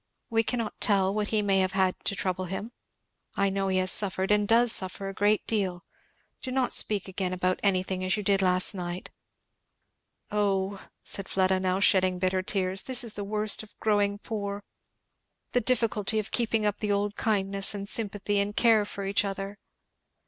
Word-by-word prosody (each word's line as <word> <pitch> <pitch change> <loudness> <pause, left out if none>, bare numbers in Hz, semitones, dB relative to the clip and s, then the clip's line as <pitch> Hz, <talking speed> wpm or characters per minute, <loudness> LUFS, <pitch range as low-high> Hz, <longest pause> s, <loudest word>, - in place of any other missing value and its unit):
We 225 0 +3
cannot 230 -1 -2
tell 195 -2 +3
what 210 0 -1
he 215 -1 0
may 195 -1 +2
have 190 0 0
had 190 -1 +2
to 200 - +1
trouble 185 -1 -2
him 195 +5 -6 0.6
I 200 0 +1
know 195 0 -1
he 190 -1 0
has 185 0 +4
suffered 190 -1 +2
and 210 0 +2
does 235 +1 +5
suffer 190 0 0
a - - -7
great 205 +2 +1
deal. 190 -5 -2 0.6
Do - - -5
not 255 -1 0
speak 205 -3 +3
again 185 -1 -3
about 185 0 -1
anything 185 -1 0
as 185 +3 +1
you 210 - -4
did 195 0 +2
last 185 +1 +4
night! 180 -1 -6 1.2
Oh," 200 -1 -1 0.2
said 195 -1 -2
Fleda, 190 0 +1
now 185 0 -1
shedding 185 -2 +3
bitter 185 +1 0
tears, 190 -2 0
"this 255 -1 0
is 230 -3 -2
the 205 - -5
worst 210 +1 +1
of 215 - -16
growing 205 -2 +1
poor! 205 -1 -5 0.9
the 245 - +1
difficulty 220 -3 +1
of 215 -1 -3
keeping 225 -2 0
up 205 -1 -1
the 210 -1 -2
old 205 +1 -1
kindness 195 -2 +1
and 200 0 -6
sympathy 205 -1 -1
and 205 +1 -2
care 225 -3 +4
for 200 -1 -6
each 200 +1 +2
other! 195 0 -5
200 Hz, 185 wpm, -27 LUFS, 190-210 Hz, 1.2 s, does